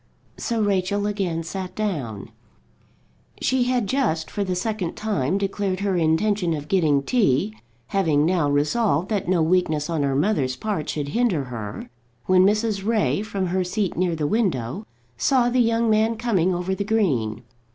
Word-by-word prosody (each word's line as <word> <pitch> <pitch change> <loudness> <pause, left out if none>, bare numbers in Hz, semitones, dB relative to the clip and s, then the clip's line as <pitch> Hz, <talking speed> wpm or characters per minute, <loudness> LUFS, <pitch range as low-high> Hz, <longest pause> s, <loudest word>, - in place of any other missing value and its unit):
So 230 -2 -1
Rachel 200 0 0
again 190 -6 -1
sat 185 +2 -6
down. 140 - -3 1.1
She 260 -1 +1
had 250 -3 +1
just, 190 - -1
for 205 - -1
the 185 -2 -2
second 190 -2 -2
time, 195 -6 -1
declared 195 -1 -2
her 200 -2 0
intention 170 +2 +1
of 145 -1 -6
getting 155 -7 +2
tea, 140 - +1 0.3
having 160 -7 +2
now 170 -4 +2
resolved 155 +4 +1
that 205 -5 -1
no 175 -3 +3
weakness 160 -3 +1
on 160 -3 0
her 140 -1 0
mother's 145 -5 +1
part 190 -1 -3
should 145 -2 -3
hinder 205 - +1
her, 115 -5 -6 0.4
when 185 0 +5
Mrs. 210 0 +1
Ray, 215 -2 +1
from 200 -3 -3
her 185 +1 0
seat 190 +1 -2
near 175 -1 0
the 155 -2 -2
window, 185 - -1 0.3
saw 245 - +2
the 255 - +2
young 230 -1 +2
man 220 +1 +2
coming 195 -6 +1
over 180 +1 -1
the 200 - -2
green. 145 - 0
185 Hz, 160 wpm, -23 LUFS, 155-215 Hz, 1.1 s, when